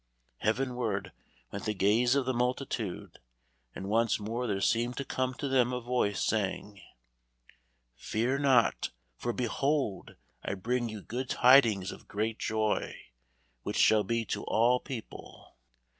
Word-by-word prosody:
Heavenward 120 -2 -1 0.4
went 100 - -6
the 110 -1 -1
gaze 110 +7 +3
of 140 -2 +1
the 130 - 0
multitude, 125 -5 -3 0.6
and 95 - -6
once 115 +2 +2
more 115 +4 -3
there 100 -3 -1
seemed 120 +5 +1
to 140 - -3
come 130 0 -2
to 140 - -3
them 130 -2 +3
a 125 - -2
voice, 120 -5 0
saying: 100 -1 -2 1.2
"Fear 120 - -1
not, 130 -5 +3 0.3
for 120 - -2
behold 130 -1 -1 0.3
I - - -2
bring 120 +5 -1
you 110 -2 -7
good 125 +2 -4
tidings 115 -7 +5
of - - -12
great 110 +2 -2
joy, 110 -1 -1 0.7
which - - -4
shall 110 -1 +5
be 115 +3 -1
to 100 - -3
all 120 +3 +3
people." 125 -5 -9
115 Hz, 140 wpm, -30 LUFS, 105-125 Hz, 1.2 s, tidings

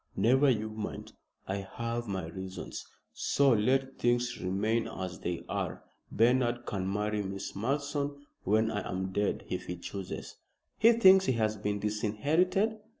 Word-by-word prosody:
"Never 130 +8 +4
you 110 -3 0
mind. 110 0 -6 0.3
I 95 - -1
have 115 +4 -4
my 95 -4 -3
reasons, 95 +2 -7 0.3
so 140 -1 +3
let 130 +5 +1
things 120 0 +1
remain 105 +5 0
as 95 -1 -5
they 85 -1 -3
are. - - -3 0.3
Bernard 120 +1 +2
can 95 -1 -2
marry 105 +1 0
Miss 95 0 -5
Malleson 140 +5 -1 0.3
when 110 +3 +2
I 105 -2 -1
am 95 +1 -2
dead 100 +1 -1
if - - -4
he 90 - -3
chooses." 95 +2 -6 0.4
"He 230 +2 +7
thinks 190 -4 +7
he 130 - +2
has 110 -2 +1
been 105 0 -2
disinherited?" 145 - +1
110 Hz, 150 wpm, -30 LUFS, 100-130 Hz, 0.4 s, He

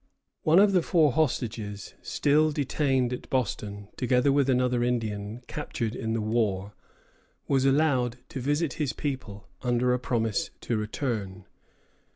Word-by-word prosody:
One 160 +2 +4
of 200 +1 +6
the 185 -2 +4
four 160 -4 +3
hostages 115 - -2
still 155 +2 +2
detained 135 -3 +1
at 125 - -7
Boston, 100 -5 -2
together 125 +2 +3
with 140 -1 +2
another 125 -1 +2
Indian 110 -1 -2
captured 115 -6 -4
in 110 -2 -2
the 115 - 0
war, 105 -3 0 0.7
was 135 -1 +2
allowed 135 -4 +2
to 135 - -5
visit 145 +2 0
his 145 - 0
people, 110 -9 -5
under 125 0 +2
a 125 - 0
promise 115 -4 -1
to 120 - -1
return. 105 -4 -3
125 Hz, 140 wpm, -27 LUFS, 110-140 Hz, 0.7 s, of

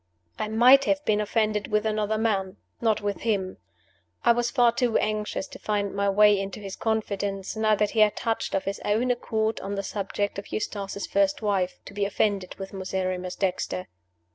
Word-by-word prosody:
I - - -1
might 250 +5 +6
have 295 0 0
been 210 -1 +2
offended 215 -1 0
with 210 0 0
another 215 0 0
man. 200 -3 0 0.2
Not 220 -2 +2
with 205 -1 -3
him. 195 -5 -1 0.7
I - - +7
was 240 0 +1
far 245 -3 +4
too 235 -1 +1
anxious 210 -2 -1
to - - -11
find 205 -2 -1
my 200 0 +1
way 205 0 +5
into 195 +1 -5
his 195 -2 -7
confidence 205 -3 -2
now 215 -1 +3
that 210 0 0
he 225 - -1
had 215 -1 +5
touched 225 -1 -2
of 195 - 0
his 195 0 -4
own 225 +5 +1
accord 220 -2 -1
on 200 +1 -4
the 200 - -2
subject 200 0 -3
of 200 - -11
Eustace's 200 -2 -3
first 200 +2 +1
wife 195 -3 0
to - - -10
be 205 0 -1
offended 200 -2 0
with 195 0 -8
Miserrimus 185 -1 -3
Dexter. 140 - -2
210 Hz, 190 wpm, -26 LUFS, 195-220 Hz, 0.7 s, I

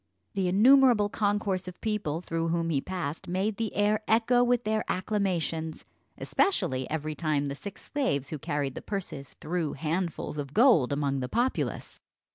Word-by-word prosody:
The 190 -2 0
innumerable 230 +2 +5
concourse 205 -3 0
of 180 - -8
people 210 -8 -2
through 165 -1 -2
whom 165 0 0
he 140 -3 +1
passed 165 -4 -4
made 195 +4 -1
the 225 -2 -3
air 210 +1 +2
echo 235 +2 +4
with 245 0 +2
their 215 0 0
acclamations, 180 -5 -1 0.3
especially 130 - 0
every 155 0 -2
time 150 -3 -1
the - - -3
six 195 +7 -9
slaves 200 - -1
who 155 - -5
carried 140 -1 -2
the - - -7
purses 180 -9 -6
threw 165 -1 -2
handfuls 165 0 -3
of 140 -1 -6
gold 220 - +5
among 140 -1 0
the 125 -1 -3
populace. 245 - -1
180 Hz, 160 wpm, -28 LUFS, 150-215 Hz, 0.3 s, innumerable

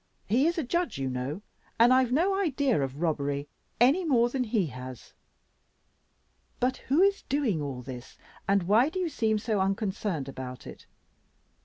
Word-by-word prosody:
He 250 +9 +3
is 340 - 0
a 325 - 0
judge 345 +7 -1
you 135 -1 -2
know, 130 +10 -4 0.3
and 240 +2 +6
I've 255 -1 +3
no 345 +9 +2
idea 285 - +1
of 135 +2 -4
robbery 145 -3 -1 0.3
any 275 +10 +4
more 245 -7 +3
than 255 0 -1
he 215 -4 +1
has. 130 -3 -9 1.5
But 255 +1 +1
who 295 +8 +2
is 400 0 +2
doing 255 - 0
all 135 -3 -5
this, 125 -1 -9 0.3
and 195 -1 +3
why 220 - +4
do 365 - -6
you 365 -2 0
seem 220 -7 0
so 215 -1 -1
unconcerned 195 -5 -1
about 130 -2 -7
it? - - -11
220 Hz, 165 wpm, -28 LUFS, -, 1.5 s, and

